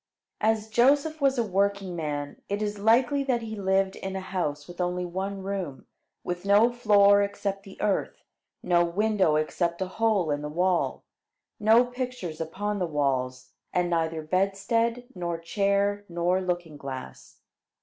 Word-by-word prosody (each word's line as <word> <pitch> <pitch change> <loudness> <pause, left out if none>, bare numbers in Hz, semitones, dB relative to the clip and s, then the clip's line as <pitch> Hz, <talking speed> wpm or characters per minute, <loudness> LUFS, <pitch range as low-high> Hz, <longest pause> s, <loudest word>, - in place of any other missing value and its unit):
As 220 0 +1
Joseph 280 +7 +3
was 275 -1 +3
a 235 - +2
working 200 -2 0
man, 145 -3 -4
it 205 +1 -1
is 205 -1 -3
likely 245 +6 +3
that 245 -3 0
he 220 -1 -5
lived 190 -1 +1
in 190 0 -5
a - - -2
house 175 -6 -3
with 175 +1 -6
only 180 0 -1
one 190 +2 -4
room, 190 -8 -4 0.4
with 175 0 -4
no 205 +4 +5
floor 205 -4 +5
except 200 -1 -2
the 195 -1 -14
earth, 205 -2 -1 0.4
no 175 -1 +3
window 190 -2 +2
except 170 +2 0
a 190 - 0
hole 195 -3 +1
in 145 0 -1
the 150 - -4
wall, 180 +3 0 0.6
no 225 +3 +5
pictures 245 -10 -5
upon 205 +6 -3
the 180 - 0
walls, 130 -4 -1 0.2
and 175 -1 +1
neither 160 -1 0
bedstead, 195 +7 0
nor 175 -2 -3
chair, 200 +4 0
nor 175 +2 +1
looking 175 -4 -3
glass. 135 -2 -8
195 Hz, 155 wpm, -27 LUFS, 170-210 Hz, 0.6 s, no